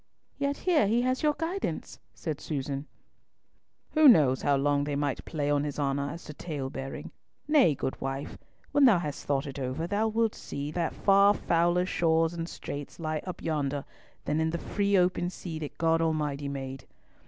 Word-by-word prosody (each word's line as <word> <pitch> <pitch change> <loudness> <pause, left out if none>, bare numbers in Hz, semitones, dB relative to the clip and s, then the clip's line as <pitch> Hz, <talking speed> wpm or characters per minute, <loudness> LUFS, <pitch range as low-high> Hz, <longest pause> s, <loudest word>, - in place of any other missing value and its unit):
"Yet 280 0 0
here 335 - +3
he 235 +4 +2
has 255 +1 0
your 300 -1 +3
guidance," 345 +4 -3 0.2
said 155 -4 -4
Susan. 140 -1 -3 1.0
"Who 310 -1 +6
knows 145 - +6
how 140 -1 +3 0.3
they 145 0 -2
might 145 -1 -1
play 145 -3 -1
on 145 0 +2
his 145 -1 -4
honour 140 -1 0
as 165 +4 -7
to 150 - -8
talebearing? 135 -4 -5 0.4
Nay, 285 - +5
good 130 - -4
wife, 135 +1 -4 0.4
when 285 -1 +5
thou 225 -7 +7
hast 150 -4 -4
thought 140 -1 0
it 140 0 -6
over, 130 +5 -2
thou 205 +5 +1
wilt 225 0 +1
see 140 +1 -5
that 165 0 -2
far 200 +1 +5
fouler 175 +1 +2
shoals 165 -2 +2
and 165 0 -4
straits 145 +3 -7
lie 155 -1 -2
up 180 - -6
yonder, 145 -3 -1 0.4
than 150 - 0
in 160 0 +1
the 170 - -2
free 200 +2 +1
open 180 -1 +2
sea 170 -3 -6
that 150 -2 -7
God 165 0 +2
Almighty 150 -3 -1
made. 135 -1 -6
160 Hz, 175 wpm, -29 LUFS, 140-195 Hz, 1.0 s, thou